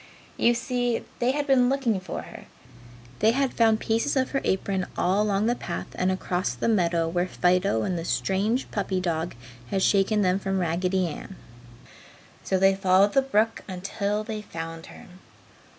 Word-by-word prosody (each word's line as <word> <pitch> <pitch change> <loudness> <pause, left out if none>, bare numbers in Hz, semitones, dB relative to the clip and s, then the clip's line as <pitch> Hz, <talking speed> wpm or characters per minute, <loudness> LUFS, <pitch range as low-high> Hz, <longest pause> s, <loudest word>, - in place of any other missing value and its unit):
You 240 0 +3
see, 245 0 -1 0.2
they 245 - +2
had 290 +2 0
been 260 -3 +4
looking 260 -7 +1
for 185 -2 -6
her. - - -11 0.7
They 220 +2 +4
had 270 0 0
found 225 -2 +3
pieces 230 +7 0
of 260 0 0
her 275 - 0
apron 190 -1 -1
all 190 +3 +2
along 205 0 +1
the 235 - +2
path 175 -8 -5
and 185 +1 0
across 185 0 -2
the - - -2
meadow 170 -6 +2
where 175 +2 0
Fido 180 - +1
and 180 -2 -1
the - - -4
strange 200 +8 0
puppy 195 -2 -1
dog 170 -3 -2 0.3
had 190 -1 0
shaken 205 +1 +3
them 185 +1 +2
from 195 0 -2
Raggedy 180 +2 0
Ann. 175 +3 -7 1.1
So 190 - 0
they 195 +1 +5
followed 195 +1 +3
the 270 - +5
brook 225 -4 +1
until 200 +3 -2
they 215 -1 -5
found 165 -3 -7
her. - - -13
195 Hz, 170 wpm, -26 LUFS, 180-225 Hz, 1.1 s, they